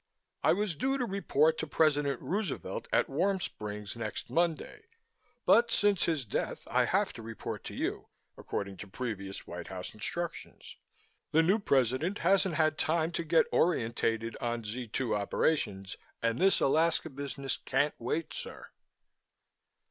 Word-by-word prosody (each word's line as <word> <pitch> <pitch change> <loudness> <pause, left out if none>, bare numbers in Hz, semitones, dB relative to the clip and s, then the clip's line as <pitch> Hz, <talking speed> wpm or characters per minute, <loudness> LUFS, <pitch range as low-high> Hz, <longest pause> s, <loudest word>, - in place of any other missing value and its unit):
"I - - +5
was 205 0 0
due 265 - 0
to 255 - 0
report 160 -6 +2
to 160 - -2
President 145 -3 +2
Roosevelt 195 -5 -3
at - - +3
Warm 190 +7 +1
Springs 105 - -5
next 115 -2 -5
Monday 170 - 0 0.6
but 235 +2 +6
since 205 -4 +3
his 155 -6 0
death, 100 - -3
I - - +4
have - - +1
to - - -9
report 115 0 -6
to - - -6
you, - - -2 0.3
according 100 -1 -4
to 105 - -8
previous 100 -3 -5
White 90 +1 -7
House 95 -1 -6
instructions. 170 +11 -5 0.6
The 160 +1 +6
new 190 +7 +3
President 140 - +1
hasn't 190 -1 +3
had 155 -1 +2
time 160 +1 +1
to 170 - -2
get 165 0 +4
orientated 115 -7 +1
on 120 -1 -2
Z 115 +3 -5
2 115 +1 -1
operations 100 -2 0 0.2
and 115 0 0
this 195 +1 +4
Alaska 160 +2 +2
business 140 -1 -4
can't 140 +3 +1
wait, 155 +7 -2
sir!" - - -7
145 Hz, 150 wpm, -31 LUFS, 115-170 Hz, 0.6 s, but